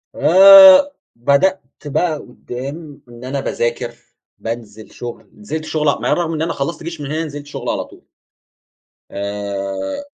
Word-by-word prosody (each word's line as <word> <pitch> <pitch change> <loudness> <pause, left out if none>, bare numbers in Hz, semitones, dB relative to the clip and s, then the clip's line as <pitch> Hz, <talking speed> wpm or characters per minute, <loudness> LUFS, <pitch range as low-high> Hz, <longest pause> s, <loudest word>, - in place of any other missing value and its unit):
آآ 195 - +8 0.2
بدأت 140 +11 +1 0.2
بقى 155 +2 -1
قدّام 140 +4 -9
إن 120 +1 -13
أنا 135 +2 -3
باذاكر، 120 -1 -3 0.4
بانزل 110 -2 -7
شغل، 115 -4 -9
نزلت 155 +10 -6
شغل 155 -2 0
ع - - -1
مع - - -3
إن - - +2
رغم 165 -2 -2
إن 155 - -3
أنا 165 +1 -1
خلصت 155 +4 -4
جيش 165 -2 -7
من 140 - -5
هنا 160 +1 -2
نزلت 145 -2 -8
شغل 145 - -6
على - - -2
طول. - - -19 1.1
آآ 100 - -5
140 Hz, 155 wpm, -18 LUFS, 120-165 Hz, 1.1 s, آآ